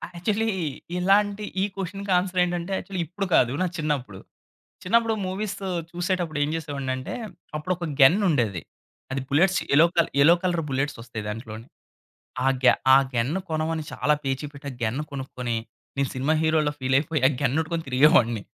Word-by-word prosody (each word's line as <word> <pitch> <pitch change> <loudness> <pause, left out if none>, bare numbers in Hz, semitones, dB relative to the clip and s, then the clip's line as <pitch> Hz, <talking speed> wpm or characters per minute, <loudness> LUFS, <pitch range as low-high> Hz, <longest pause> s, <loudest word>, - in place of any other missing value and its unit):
Actually 210 +6 0 0.5
ఇలాంటి 200 +3 +2 0.2
ఈ - - +3
క్వెషన్‌కి 195 +1 -4
answer 180 0 -1
ఏంటంటే 175 +1 -2
యాక్చువలి 195 -2 -5
ఇప్పుడు 195 +5 -4
కాదు 120 - +4
నా 185 - +2
చిన్నప్పుడు, 140 -11 -2 0.6
చిన్నప్పుడు 230 +4 +2
మూవీసు 195 +1 -4 0.2
చూసేటప్పుడు 175 -3 -2
ఏం 145 - +1
జేసేవాడినంటే 140 -5 -4 0.4
అప్పుడు 155 +5 -2
ఒక 175 - -6 0.2
గెన్నుండేది. 135 - +4 0.5
అది 135 - -1
బుల్లెట్స్ 180 +7 +3
యెల్లో 155 +4 +7
క 170 - +6 0.2
యెల్లో 160 +4 +7
కలర్ 175 -3 0
బుల్లెట్స్ 135 +2 -1
ఒస్తాయి 115 -2 -7
దాంట్లోని. 110 +1 -7 0.8
ఆ - - +3
గ్య 130 - +7 0.2
ఆ - - +9 0.2
గ్యన్ 120 +4 0 0.2
కొనమని 160 0 -1
చాలా 150 - +1
పేచి 135 +1 -2
పెట్టి 145 0 -10
ఆ - - -9
గ్యన్ 115 +4 -1
కొనుక్కొని 125 -3 -4 0.4
నేను 140 -1 +1
సినిమా 135 +4 +1
హీరోల 160 -1 +2
ఫీల్ 130 0 +1
అయిపోయి 155 -1 -2
ఆ - - +3
గన్నెట్టుకొని 160 +5 0
తిరిగేవాడిని. 125 - +4
155 Hz, 150 wpm, -25 LUFS, 130-180 Hz, 0.8 s, ఆ